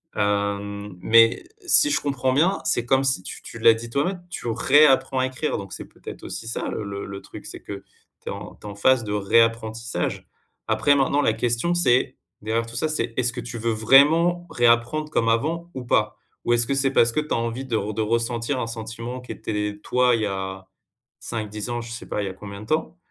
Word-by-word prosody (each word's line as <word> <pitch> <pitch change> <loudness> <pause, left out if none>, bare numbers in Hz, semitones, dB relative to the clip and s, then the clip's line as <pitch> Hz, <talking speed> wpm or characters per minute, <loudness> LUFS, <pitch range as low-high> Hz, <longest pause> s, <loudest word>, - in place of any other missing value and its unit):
Hem, 100 0 -1
mais 115 +2 +5 0.2
si 310 -4 +5
je 295 - +2
comprends 130 -2 -1
bien, 170 +8 +2
c'est 120 - +1
comme 135 +2 +3
si 130 -9 +1
tu - - -8
tu - - -10
l'as 115 - +6
dit 115 +1 -7
toi-même, 175 +9 -1
tu 120 - -6
réapprends 135 +3 +4
à 130 - +2
écrire. 130 +4 -2
Donc, 100 -1 -8
c'est - - -7
peut-être - - -11
aussi 115 - -6
ça, 115 - -3
le - - -4
le 100 0 -5
le 100 0 -7
truc. - - -11
C'est - - -9
que 100 -1 -8 0.4
tu - - -7
es - - -2
en - - -8
tu 105 - -12
es - - -5
en 100 - -8
phase 120 +3 +3
de 105 - -4
réapprentissage. 115 +2 0 0.4
Après, 145 - +3
maintenant, 140 +1 +2
la 110 - +3
question, 120 +9 0
c'est 130 -8 +2 0.3
derrière 115 +1 -1
tout 115 - -10
ça, 150 +6 0
c'est: 120 -7 -2
est-ce 120 -1 +1
que 125 - -6
tu 120 0 -7
veux 115 +1 -1
vraiment 150 +10 +4
réapprendre 120 +6 +2
comme 115 -6 +1
avant 165 +9 -1
ou 130 - -6
pas? - - +1 0.3
Ou 120 - +3
est-ce 120 0 +2
que 140 - 0
c'est 135 0 +2
parce 115 -3 +4
que 155 - 0
tu 150 - -3
as - - +1
envie 115 +3 -3
de 120 -4 -2
re 105 0 -3
de 110 - 0
ressentir 115 +3 -1
un 115 - -2
sentiment 115 +2 -6
qui 125 - -9
était, 105 -1 -3
toi, 125 0 +3
il 115 - -2
y - - +2
a 95 -1 -5 0.5
5-10 110 -1 -5
ans, 120 0 -2
je 115 - -9
sais 115 - -7
pas, - - -2
il - - -3
y - - -2
a - - -7
combien 100 +1 -9
de - - -9
temps. 160 +2 -1
115 Hz, 230 wpm, -23 LUFS, 110-135 Hz, 0.5 s, l'as